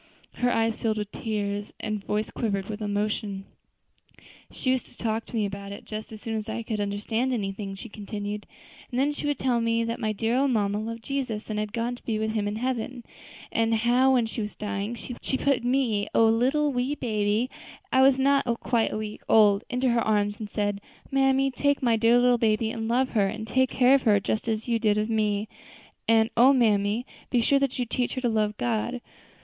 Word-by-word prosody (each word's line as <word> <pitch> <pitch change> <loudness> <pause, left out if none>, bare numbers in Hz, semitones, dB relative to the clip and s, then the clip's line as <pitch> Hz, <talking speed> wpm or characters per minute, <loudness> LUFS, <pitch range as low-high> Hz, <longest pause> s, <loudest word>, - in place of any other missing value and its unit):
Her 245 - +2
eyes 225 -1 0
filled 220 -1 0
with 210 -1 -4
tears 205 -2 -3
and 215 -1 -3
her - - -25
voice 210 +1 -1
quivered 200 -4 -2
with 215 0 -5
emotion. 205 -1 -2 1.0
"She 255 - -1
used 260 -1 -1
to - - -16
talk 225 0 -2
to - - -9
me 215 -2 +1
about 200 0 -6
it 200 - -9
just 215 0 -6
as 215 - -8
soon 225 0 -5
as 215 0 -4
I 230 +1 -3
could 220 -1 -3
understand 210 +5 -1
anything," 195 -3 -3
she 195 - -9
continued; 205 -1 -6 0.4
"and 250 - -2
then 280 +2 +2
she 290 0 -4
would 290 - 0
tell 245 -3 +1
me 230 0 +1
that 230 0 -3
my 220 - -1
own 215 - -2
dear 240 +6 +1
mamma 205 -5 +1
loved 230 +1 -5
Jesus, 240 -6 -3
and 210 - -1
had 210 -1 -3
gone 235 +2 -2
to - - -17
be 220 -2 -1
with 220 0 -1
Him 215 -2 -1
in 205 - -2
heaven; 250 +1 -3 0.5
and 225 0 +2
how, 245 +4 +3
when 245 -3 +3
she 225 +1 -4
was 210 0 -5
dying, 210 +2 -3
she 245 +3 -4
put 275 -3 +1
me 245 -5 +1
a - - +5
little, 260 +6 +3
wee 255 +3 0
baby, 215 -2 0 0.4
I 260 - +4
was 265 0 +6
then 265 - 0
not 275 -4 +2
quite 235 -3 +1
a - - -2
week 215 -1 -6
old 210 -1 +5
into 250 +1 +1
her 235 -1 +2
arms, 205 -1 +1
and 215 -2 -6
said, 205 -1 -1 0.3
'Mammy, 270 0 +3
take 285 +2 0
my 235 -2 +4
dear 230 +2 +4
little 245 0 +4
baby 220 0 +2
and 225 -1 -4
love 255 +3 +2
her, 205 -4 +2
and 220 +2 -5
take 260 +2 +2
care 255 +1 +4
of 275 - +5
her 210 -4 +4
just 215 +3 -2
as 220 0 -2
you 230 -1 +1
did 210 -2 +2
of 215 +2 0
me; 210 -1 0 0.6
and 225 0 +4
O 255 +4 +7
mammy! 215 -2 +2 0.2
be 245 - +2
sure 275 +4 +3
that 275 -2 -1
you 250 - 0
teach 245 +1 -1
her 255 - -3
to 245 - +1
love 215 -1 0
God.' 240 +1 -1
225 Hz, 220 wpm, -26 LUFS, 210-245 Hz, 1.0 s, O